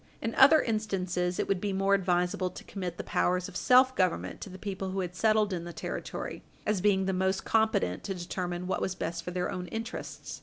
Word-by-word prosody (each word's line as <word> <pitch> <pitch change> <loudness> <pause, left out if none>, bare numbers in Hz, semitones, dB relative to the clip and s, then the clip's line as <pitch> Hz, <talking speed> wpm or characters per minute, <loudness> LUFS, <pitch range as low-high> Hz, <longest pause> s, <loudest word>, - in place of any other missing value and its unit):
In 225 0 -2
other 285 +4 +7
instances, 185 -5 -1
it - - -1
would 195 -2 0
be 205 -2 -1
more 195 +1 +2
advisable 180 -1 +1
to - - -10
commit 180 -4 -5
the - - -4
powers 180 0 +1
of - - -12
self 255 +4 +5
government 185 -3 0
to - - -6
the 185 - -9
people 195 -1 -4
who 190 +1 -2
had 180 -1 -5
settled 215 0 +3
in 170 -2 -3
the 170 0 -7
Territory, - - -5 0.2
as 210 -3 +1
being 190 -1 +3
the 190 - 0
most 190 +1 0
competent 220 - +1
to 195 - -3
determine 175 0 -4
what 190 - -1
was 190 - -1
best 170 -1 -3
for - - -5
their 180 0 -2
own 180 -1 -4
interests. 225 +4 -6
190 Hz, 220 wpm, -29 LUFS, 180-210 Hz, 0.2 s, other